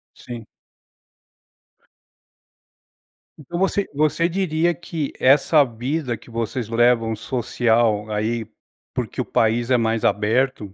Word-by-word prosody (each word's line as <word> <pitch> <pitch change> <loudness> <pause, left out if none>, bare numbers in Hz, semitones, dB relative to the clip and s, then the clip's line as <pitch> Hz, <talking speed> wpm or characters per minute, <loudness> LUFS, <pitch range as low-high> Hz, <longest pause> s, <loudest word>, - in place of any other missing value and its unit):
Sim. 120 -2 -9 2.9
Então 160 +4 -7
você 195 +1 +1
você 155 +3 +2
diria 175 -2 +1
que 165 -2 -5
essa 145 +3 +5
vida 125 +1 -3
que - - -18
vocês 115 +1 -3
levam 115 -1 +2
social 115 -2 0
aí, 110 +2 -1 0.5
porque - - -3
o - - -4
país 115 +2 +1
é 125 - +5
mais 115 -1 0
aberto, 110 0 +1
120 Hz, 105 wpm, -22 LUFS, 115-150 Hz, 2.9 s, essa